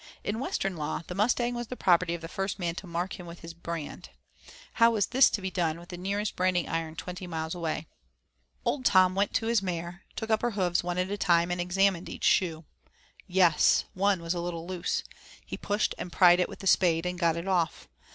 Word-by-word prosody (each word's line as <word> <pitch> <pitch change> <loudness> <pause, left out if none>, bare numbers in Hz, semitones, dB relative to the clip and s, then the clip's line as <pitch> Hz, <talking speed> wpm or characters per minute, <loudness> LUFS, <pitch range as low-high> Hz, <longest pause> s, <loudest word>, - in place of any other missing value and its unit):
In 215 +2 -2
Western 195 -8 -2
law 150 +2 -3
the - - -6
Mustang 240 +5 +1
was 240 -1 -4
the 250 - -6
property 175 -5 +3
of 170 - -8
the 165 - -6
first 195 +3 -3
man 175 -3 -2
to 185 +2 -8
mark 175 +3 -3
him 175 - -9
with 170 0 -10
his 165 0 -8
brand; 170 -2 -6 0.7
how 230 - +8
was 215 -4 +1
this 260 +5 +5
to 200 - -3
be 190 - -2
done 170 -3 -1
with 175 - -14
the 180 - -6
nearest 200 +3 -2
branding 180 -1 +1
iron 165 -1 -3
twenty 180 +3 -6
miles 160 -1 -3
away? 165 -3 -3 0.8
Old 275 - 0
Tom 185 -5 +5
went 200 +1 +1
to 225 - +1
his 230 -2 +2
mare, 175 -1 -4
took 220 0 -4
up 220 - +3
her 240 - +1
hoofs 175 -3 +1
one 175 0 -3
at 185 +2 -1
a 205 - -2
time, 170 -1 +3
and 175 0 -1
examined 185 0 +1
each - - -8
shoe. 165 -3 +2 0.6
Yes! 180 -4 +4
one 195 -2 +1
was 165 +1 -1
a 175 - -3
little 170 -1 -4
loose; 180 -1 -2 0.4
he - - -5
pushed 205 +1 -1
and 180 - -5
pried 175 0 +6
it 180 - +1
with - - -10
the - - -8
spade, 175 -3 +3
and 180 0 -3
got 170 -2 +2
it 170 +3 -5
off. 175 -4 0
180 Hz, 225 wpm, -28 LUFS, 170-195 Hz, 0.8 s, how